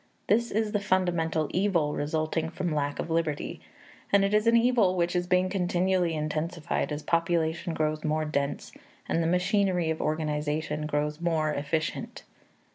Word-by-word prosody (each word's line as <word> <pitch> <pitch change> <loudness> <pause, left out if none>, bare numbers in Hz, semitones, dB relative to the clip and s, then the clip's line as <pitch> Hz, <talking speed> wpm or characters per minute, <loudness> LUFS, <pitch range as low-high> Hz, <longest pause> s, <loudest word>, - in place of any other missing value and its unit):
This 235 +2 +2
is 215 0 0
the 210 - +1
fundamental 170 -5 +1
evil 175 -6 +1
resulting 155 +2 -1
from 175 -1 -3
lack 145 -1 -1
of 165 - -4
liberty; 160 -3 -1 0.5
and 200 0 +5
it 200 - -1
is 210 +2 +3
an 230 0 +6
evil 230 -6 +3
which 175 0 0
is 180 0 0
being 180 +1 +3
continually 180 -2 +1
intensified 155 +2 -2
as 150 0 -4
population 170 0 0
grows 155 0 -1
more 155 0 0
dense 140 -2 -2 0.4
and 165 - +1
the 165 - +1
machinery 180 -1 +1
of 160 - -3
organization 150 0 -1
grows 150 +1 -1
more 160 -3 +1
efficient. 155 +3 -3
165 Hz, 155 wpm, -28 LUFS, 155-185 Hz, 0.5 s, an